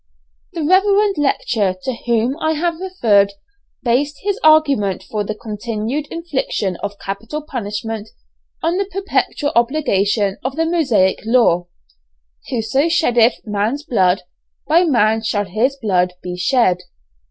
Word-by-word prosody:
The 325 - -3
reverend 395 +2 +3
lecturer 220 -8 0
to 260 - -2
whom 235 +3 +1
I 315 0 +1
have 335 +1 -1
referred, 220 - +2 0.5
based 280 +4 +1
his 405 0 -1
argument 280 - +3
for 210 +2 -3
the 215 +1 -4
continued 225 +6 -4
infliction 275 - -2
of 205 0 -5
capital 220 +11 -5
punishment 220 -5 -5 0.5
on 335 +3 +1
the 395 - 0
perpetual 385 -6 -1
obligation 210 -6 +1
of 265 +1 -3
the 325 +1 +1
Mosaic 255 - +2
law: 220 -7 +3 0.8
"Whoso 250 +8 0
sheddeth 245 -8 +3
man's 215 +7 -1
blood, 190 - +1 0.4
by 335 +4 +4
man 225 -7 +2
shall 210 -2 -1
his 220 +9 0
blood 180 -7 +1
be 180 -1 -4
shed." 185 -1 +2
235 Hz, 130 wpm, -18 LUFS, 205-310 Hz, 0.8 s, by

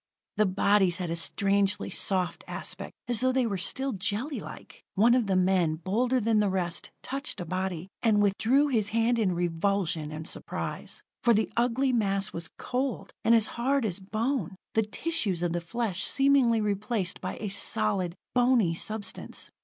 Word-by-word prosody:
The 215 -1 +4
bodies 190 -1 +3
had 180 -3 -3
a - - -1
strangely 195 +5 +1
soft 185 -3 0
aspect, - - -5
as 240 -3 +1
though 255 0 +2
they 260 -1 +1
were 200 -4 -2
still 265 +9 0
jellylike. 210 - -4
One 225 +5 +5
of 245 -4 +2
the 190 - +1
men, 185 -3 +2
bolder 230 +10 0
than 225 -1 +2
the 205 -1 +2
rest, 180 -3 -2
touched 275 -5 -4
a 175 - -4
body 185 0 -3
and 220 -3 +3
withdrew 225 +8 +3
his 220 -6 +1
hand 230 +2 +2
in 190 -5 +1
revulsion 175 -2 -1
and 155 +1 -6
surprise. - - -5 0.2
For 235 -1 +4
the 215 - 0
ugly 250 +3 +1
mass 200 -3 +1
was 165 -1 -5
cold, 255 +1 -3
and 230 - +5
as 225 -2 +5 0.2
hard 270 0 +2
as 195 -2 -2
bone: 215 - -2 0.2
the 220 - +3
tissues 210 - -1
of 170 -1 0
the 175 - -1
flesh 205 +1 -2
seemingly 270 -4 +3
replaced 205 -2 -1
by - - -4
a 210 - -4
solid, 180 - +1 0.2
bony 245 -8 +3
substance. 215 +4 -3
205 Hz, 170 wpm, -28 LUFS, 185-240 Hz, 0.2 s, One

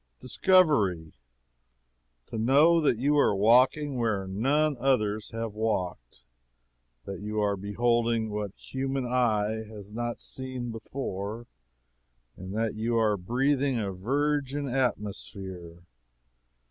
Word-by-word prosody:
Discovery! 130 - +2 1.2
To 110 - -4
know 145 +8 +5
that 140 -6 +2
you 145 +4 +2
are 105 - +3
walking 125 +6 +3
where 110 -5 0
none 140 +10 +1
others 110 -5 +1
have 115 -1 -4
walked; 90 - -3 0.8
that 95 -2 -6
you 105 +1 -3
are 100 -1 +1
beholding 115 +2 0
what 105 -2 -4
human 135 0 -3
eye 110 -3 +1
has 105 -2 -11
not 120 +2 -3
seen 130 -2 -5
before; 115 -2 -5 0.9
that 105 +4 -3
you 115 +2 -1
are 110 -2 +3
breathing 130 +7 0
a 100 -3 -2
virgin 140 +6 -1
atmosphere. 95 -8 -4
115 Hz, 110 wpm, -28 LUFS, 105-130 Hz, 1.2 s, know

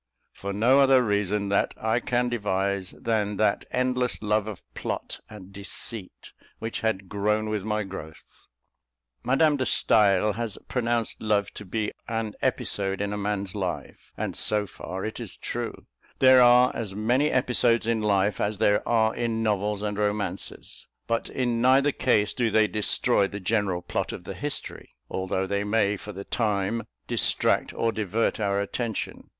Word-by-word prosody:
For 100 - -5
no 120 +7 +4
other 135 -2 +6
reason 100 -1 0
that 100 - +1
I 110 +2 +1
can 125 0 0
devise 100 -4 -1
than 105 -3 0
that 105 -1 +1
endless 125 -1 0
love 105 0 +1
of 105 -4 -7
plot - - -4
and 100 -2 -12
deceit 100 +1 -7 0.3
which 115 0 -4
had 100 -4 -1
"grown 105 +2 0
with 105 -2 -2
my 105 0 -1
growth." 95 -5 -10 0.8
Madame 145 +3 +3
de 130 - 0
Stael 105 -1 +3
has 115 -1 -4
pronounced 120 -3 -1
love 105 -2 +1
to 105 - -9
be 105 +3 -2 0.2
an 115 -2 -2
episode 95 -1 -1
in 100 0 -2
a - - -2
man's 100 -2 -2
life; 95 -4 -5
and - - -3
so 105 -1 +2
far 95 0 -6
it 110 - -5
is - - -5
true. - - -5 0.3
There 130 -1 +7
are 125 +1 +6
as 105 -4 -4
many 125 +8 +2
episodes 120 -3 +2
in 115 -1 +1
life 100 -1 +1
as 105 0 0
there 105 +1 +3
are 110 -1 +3
in 115 -2 -1
novels 105 -1 0
and 105 -1 -2
romances; 105 0 -3 0.2
but 115 0 -1
in 120 -3 -1
neither 135 +3 +5
case 105 -7 +2
do 120 -3 +1
they 110 0 +4
destroy 105 -2 +2
the 100 +1 -6
general 95 -3 0
plot - - -2
of - - -7
the 95 - -6
history, 140 +10 -6 0.2
although 95 0 -1
they 100 +1 -1
may, 105 -1 +2
for 105 +1 -8
the 100 0 -7
time, 105 0 -1 0.2
distract - - +1
or 115 - +1
divert 110 +1 -1
our 100 -1 +1
attention. 110 +2 -4
105 Hz, 165 wpm, -26 LUFS, 100-115 Hz, 0.8 s, There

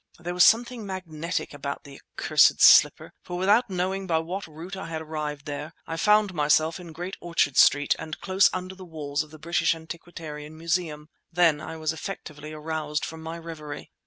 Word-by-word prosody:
There 175 +1 -5
was 180 0 +5
something 235 0 +3
magnetic 175 -5 -4
about 140 0 -5
the 140 -2 -13
accursed - - +3
slipper, - - +6
for 175 - -6
without 205 +6 +3
knowing 190 +1 -2
by 165 -3 +2
what 175 +4 -4
route 165 +5 -8
I 190 - -6
had 160 -1 -4
arrived 150 -2 -5
there, 150 +2 -5
I 165 - -4
found 210 +3 +3
myself 155 +2 +2
in 175 -2 -10
Great 175 +4 -6
Orchard 165 -5 +1
Street 145 0 +5
and 155 - -6
close 190 +1 +4
under 185 0 -5
the 190 0 -11
walls 150 -4 -3
of 155 - -8
the 155 - -12
British 170 +1 +1
Antiquarian 160 -2 -9
Museum. 165 -2 -2 0.2
Then 165 -3 +3
I 160 - -7
was 155 0 -1
effectually 155 -3 -7
aroused 155 -1 -3
from 160 0 -8
my 165 +1 -6
reverie. 155 -3 -8
165 Hz, 185 wpm, -26 LUFS, 150-180 Hz, 0.2 s, slipper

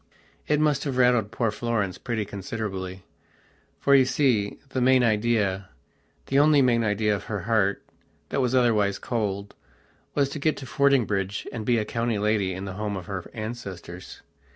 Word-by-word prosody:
It 150 0 +2
must 150 -2 +2
have 135 -3 -2
rattled 125 -4 +3
poor 115 0 -1
Florence 105 -4 -2
pretty 110 -3 -2
considerably, 95 -2 -5 0.8
for 140 - +3
you 135 -2 +7
see, 125 -6 +1
the 130 -1 -2
main 130 0 +5
ideathe 105 -4 +1 0.7
only 145 +2 +5
main 120 -3 +3
idea 105 0 +1
of 100 - -7
her 105 -3 -3
heart, 100 -1 +1 0.5
that 135 - 0
was 125 0 +1
otherwise 105 -6 +3
coldwas 105 +5 -4
to 150 - -5
get 155 +2 +1
to 135 - -7
Fordingbridge 115 -9 +1
and 110 -3 -5
be 120 -1 +3
a 110 - 0
county 115 0 -1
lady 105 -2 +1
in 95 +2 -5
the 95 - -5
home 105 0 -3
of 90 - -7
her 95 -4 -6
ancestors. 100 -5 -7
110 Hz, 160 wpm, -25 LUFS, 100-125 Hz, 0.8 s, you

